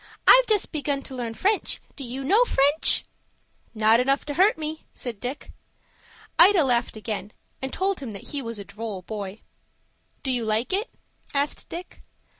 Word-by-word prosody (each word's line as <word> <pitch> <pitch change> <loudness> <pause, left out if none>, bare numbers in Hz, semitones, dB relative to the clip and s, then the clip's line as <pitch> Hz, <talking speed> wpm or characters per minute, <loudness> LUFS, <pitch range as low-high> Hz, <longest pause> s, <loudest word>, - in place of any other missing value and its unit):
I've - - +9
just 425 -3 +2
begun 285 -3 -2
to 265 - -7
learn 235 -2 -4
French. 405 - +1 0.2
Do 280 - -7
you 255 +2 -5
know 410 - +5
French?" 290 - +3 0.7
"Not 220 +1 +5
enough 275 +2 +1
to 295 - -3
hurt 380 +6 +4
me," 310 0 -5
said 235 -5 -6
Dick. 255 +5 -5 0.9
Ida 360 -1 +8
laughed 240 -4 0
again, 210 -1 -5 0.3
and 265 0 -3
told 385 0 -1
him 260 -5 -6
that 200 - -8
he 285 - -3
was 230 -3 -5
a 200 - -6
droll 210 -3 -6
boy. 205 0 -6 0.8
"Do 265 - -1
you 245 -2 -1
like 220 - 0
it?" 410 +5 0 0.5
asked 285 +1 -1
Dick. 350 +2 -8
265 Hz, 170 wpm, -25 LUFS, 225-315 Hz, 0.9 s, I've